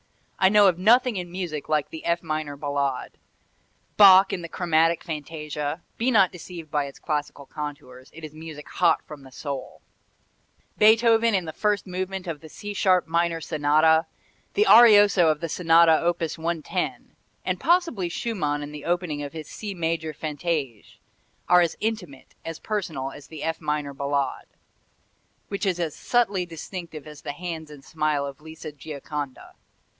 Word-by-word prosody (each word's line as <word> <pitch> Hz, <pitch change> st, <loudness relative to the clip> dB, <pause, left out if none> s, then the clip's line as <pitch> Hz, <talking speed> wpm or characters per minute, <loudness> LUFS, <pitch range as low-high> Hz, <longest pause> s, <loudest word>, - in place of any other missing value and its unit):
I 190 Hz, -, +5 dB
know 205 Hz, 0 st, +6 dB
of 180 Hz, -2 st, +2 dB
nothing 235 Hz, +3 st, +4 dB
in 175 Hz, -1 st, -5 dB
music 175 Hz, -5 st, -5 dB
like 150 Hz, -2 st, 0 dB
the 160 Hz, -, -8 dB
F 170 Hz, 0 st, 0 dB
minor 155 Hz, -2 st, -3 dB
Ballade. 140 Hz, -2 st, -2 dB, 0.8 s
Bach 195 Hz, -1 st, +8 dB
in 180 Hz, -, -3 dB
the 170 Hz, -, -7 dB
Chromatic 165 Hz, -1 st, +1 dB
Fantasia 150 Hz, -1 st, -5 dB
be 240 Hz, +3 st, +1 dB
not 200 Hz, -7 st, +4 dB
deceived 170 Hz, -3 st, -10 dB
by 145 Hz, -1 st, 0 dB
its 140 Hz, -, -10 dB
classical 150 Hz, -2 st, -4 dB
contours, 140 Hz, -4 st, -8 dB
it 165 Hz, -, -13 dB
is 155 Hz, -1 st, -8 dB
music 155 Hz, -1 st, -9 dB
hot 170 Hz, -3 st, +2 dB
from 150 Hz, -2 st, -10 dB
the 135 Hz, -1 st, -14 dB
soul 140 Hz, 0 st, -7 dB, 1.0 s
Beethoven 225 Hz, +1 st, +5 dB
in 185 Hz, -3 st, 0 dB
the 160 Hz, -, -6 dB
first 210 Hz, +2 st, 0 dB
movement 185 Hz, 0 st, -4 dB
of 165 Hz, -4 st, -5 dB
the 160 Hz, -, -12 dB
C 205 Hz, +5 st, -7 dB
sharp 185 Hz, -3 st, +2 dB
minor 170 Hz, 0 st, 0 dB
Sonata, 160 Hz, +1 st, +3 dB, 0.5 s
the 420 Hz, -, +4 dB
arioso 205 Hz, -, +7 dB
of 155 Hz, -1 st, +1 dB
the 165 Hz, -, -3 dB
Sonata 165 Hz, 0 st, +4 dB
op. 175 Hz, 0 st, +1 dB
110, 165 Hz, 0 st, -3 dB, 0.3 s
and -, -, -1 dB
possibly 335 Hz, -, +1 dB
Schumann 155 Hz, -8 st, -2 dB
in 145 Hz, -, -7 dB
the 150 Hz, -1 st, -9 dB
opening 175 Hz, -4 st, -1 dB
of 145 Hz, +1 st, -6 dB
his 155 Hz, -2 st, -7 dB
C 205 Hz, -3 st, -6 dB
major 160 Hz, -2 st, -2 dB
Fantaisie, 150 Hz, -6 st, -4 dB, 0.5 s
are 180 Hz, 0 st, +6 dB
as 170 Hz, -2 st, 0 dB
intimate, 195 Hz, -11 st, -4 dB
as 165 Hz, -1 st, -6 dB
personal 165 Hz, -12 st, -3 dB
as 145 Hz, 0 st, -12 dB
the 155 Hz, -2 st, -8 dB
F 160 Hz, 0 st, -2 dB
minor 150 Hz, -1 st, -2 dB
Ballade, 140 Hz, -1 st, -2 dB, 1.0 s
which 200 Hz, 0 st, -2 dB
is 180 Hz, -2 st, 0 dB
as 165 Hz, -4 st, -2 dB
subtly 205 Hz, -7 st, 0 dB
distinctive 165 Hz, -2 st, -8 dB
as 150 Hz, -1 st, -11 dB
the 145 Hz, -, -5 dB
hands 160 Hz, -1 st, -6 dB
and 145 Hz, -2 st, -13 dB
smile 155 Hz, -2 st, -1 dB
of 140 Hz, 0 st, -8 dB
Lisa 160 Hz, 0 st, -9 dB
Gioconda. 145 Hz, -1 st, -7 dB
165 Hz, 165 wpm, -25 LUFS, 150-185 Hz, 1.0 s, Bach